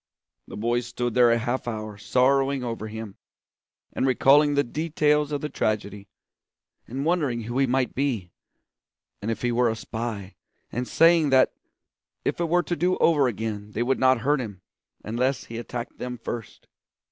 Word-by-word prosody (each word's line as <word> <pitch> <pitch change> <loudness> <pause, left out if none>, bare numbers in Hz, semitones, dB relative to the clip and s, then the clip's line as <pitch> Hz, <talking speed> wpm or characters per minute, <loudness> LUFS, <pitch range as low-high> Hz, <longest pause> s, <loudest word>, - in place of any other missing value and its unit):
The - - -8
boys 120 +2 0
stood 120 -1 -3
there 120 0 +5
a 115 - +4
half 120 +2 -2
hour 110 -2 -4
sorrowing 135 +5 +2
over 115 -2 -4
him, 110 -2 -8 0.8
and 135 - 0
recalling 145 +3 +5
the 140 - +3
details 150 +1 +1
of 145 -1 -2
the 150 - -2
tragedy, 105 -4 -2 0.8
and 135 +4 -4
wondering 150 -9 +1
who 120 +4 -3
he 135 - +3
might 130 0 0
be, 120 -10 -2 0.9
and 105 - -3
if 115 - -3
he 120 - +1
were 120 0 +3
a 110 - -1
spy, 110 -4 -5 0.4
and 125 +1 -3
saying 165 -2 +4
that 130 -1 +4 0.7
if - - -1
it 170 -1 0
were 175 +1 +3
to 175 - -2
do 180 +2 +1
over 150 -5 +4
again 105 -2 -4
they 115 - 0
would 130 +2 0
not 130 -2 +4
hurt 140 +2 +2
him 100 -6 -7 0.4
unless 125 +5 -1
he 115 0 -7
attacked 120 0 -6
them 125 0 -4
first. 115 -1 -7
125 Hz, 170 wpm, -25 LUFS, 115-140 Hz, 0.9 s, there